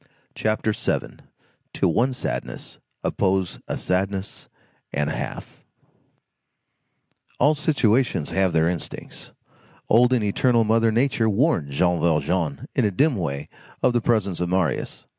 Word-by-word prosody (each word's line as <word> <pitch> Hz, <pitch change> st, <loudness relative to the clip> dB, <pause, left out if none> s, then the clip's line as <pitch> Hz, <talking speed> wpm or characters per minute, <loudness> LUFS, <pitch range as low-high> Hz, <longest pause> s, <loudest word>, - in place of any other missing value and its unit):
CHAPTER 110 Hz, 0 st, 0 dB
VII—TO -, -, -4 dB
ONE 120 Hz, +10 st, +2 dB
SADNESS 125 Hz, -, -5 dB, 0.2 s
OPPOSE 95 Hz, -2 st, 0 dB
A -, -, -3 dB
SADNESS 95 Hz, +1 st, -2 dB, 0.4 s
AND 75 Hz, +1 st, -1 dB
A -, -, -3 dB
HALF -, -, -7 dB, 1.7 s
All 150 Hz, -, +4 dB
situations 130 Hz, -, +1 dB
have 95 Hz, -1 st, +2 dB
their 80 Hz, 0 st, +3 dB
instincts. 85 Hz, -2 st, -5 dB, 0.6 s
Old 120 Hz, +3 st, +5 dB
and 125 Hz, -4 st, +2 dB
eternal 115 Hz, +3 st, +2 dB
Mother 115 Hz, +1 st, +3 dB
Nature 120 Hz, -1 st, +2 dB
warned 100 Hz, -, +1 dB
Jean 90 Hz, +5 st, +1 dB
Valjean 80 Hz, -1 st, 0 dB
in -, -, +1 dB
a 105 Hz, -, +3 dB
dim 140 Hz, -, +2 dB
way 75 Hz, -7 st, -3 dB, 0.4 s
of 125 Hz, -, +4 dB
the 120 Hz, -, +2 dB
presence 105 Hz, -7 st, 0 dB
of 90 Hz, 0 st, -1 dB
Marius. 90 Hz, -6 st, -1 dB
100 Hz, 125 wpm, -23 LUFS, 85-115 Hz, 1.7 s, Old